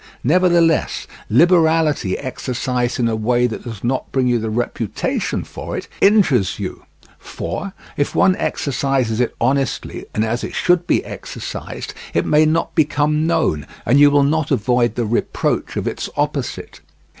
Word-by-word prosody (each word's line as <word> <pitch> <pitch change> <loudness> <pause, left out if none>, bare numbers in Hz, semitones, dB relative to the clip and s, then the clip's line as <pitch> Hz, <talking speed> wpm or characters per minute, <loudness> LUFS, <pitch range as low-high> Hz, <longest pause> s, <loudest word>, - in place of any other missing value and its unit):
Nevertheless, 170 0 +2 0.2
liberality 160 - +3
exercised 125 -2 -2
in 120 - +2
a 115 - 0
way 120 +3 +1
that 115 - -3
does 115 -4 -7
not 130 +2 -1
bring 130 -1 +1
you 120 -1 +2
the 110 0 -3
reputation 115 -1 -2
for - - -6
it, - - -6
injures 185 - +4
you; - - -6 0.3
for 185 - -5 0.2
if 145 - -1
one 185 - +4
exercises 130 -4 -1
it 125 - 0
honestly 135 +2 -1
and 110 - +1
as 120 +2 -2
it - - -5
should 175 -1 +2
be - - +1
exercised, - - -7 0.2
it - - +2
may 155 +1 +4
not 165 +2 0
become 150 0 +1
known, 75 - 0 0.2
and 135 +4 +4
you 145 0 +8
will 145 0 +4
not 155 +1 +1
avoid 120 0 +1
the 120 - -1
reproach 115 +2 -1
of - - -2
its - - -3
opposite. - - -3
130 Hz, 155 wpm, -19 LUFS, 120-155 Hz, 0.3 s, you